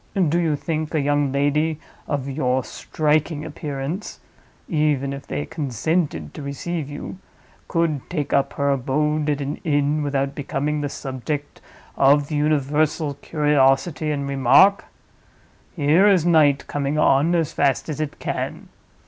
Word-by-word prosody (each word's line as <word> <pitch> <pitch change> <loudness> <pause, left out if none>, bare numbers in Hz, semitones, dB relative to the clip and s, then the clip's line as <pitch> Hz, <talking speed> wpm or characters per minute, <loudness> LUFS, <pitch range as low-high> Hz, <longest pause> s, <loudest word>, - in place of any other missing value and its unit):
Do 170 +3 +2
you 160 -3 +1
think 155 +2 -3
a - - +3
young 145 -1 +1
lady 145 +3 +1 0.3
of 140 -2 -2
your 130 -2 0
striking 155 +1 -1
appearance 150 +4 -5 0.5
(even 150 -4 0
if 140 0 -9
they 75 -1 -3
consented 140 - -2
to - - -8
receive 145 +2 -4
you) 145 +5 -7 0.5
could 165 -5 -1
take 150 -5 -3
up 140 - +2
her 140 0 0
abode 150 +3 0
at 145 -1 0
an 140 +1 -3
inn 145 -1 0
without 140 -1 -1
becoming 145 +1 -2
the 145 - -2
subject 140 +2 -5 0.3
of 140 +2 +3
universal 150 0 +1
curiosity 145 +1 +1
and 140 -2 -2
remark? 140 +9 +4 0.9
Here 160 +5 +4
is 185 -5 +4
night 155 -5 +4
coming 145 +1 -2
on 150 +3 +3
as 165 -2 0
fast 140 -2 +1
as 155 -1 -3
it 150 -2 -4
can. - - -4
145 Hz, 140 wpm, -22 LUFS, 140-155 Hz, 0.9 s, remark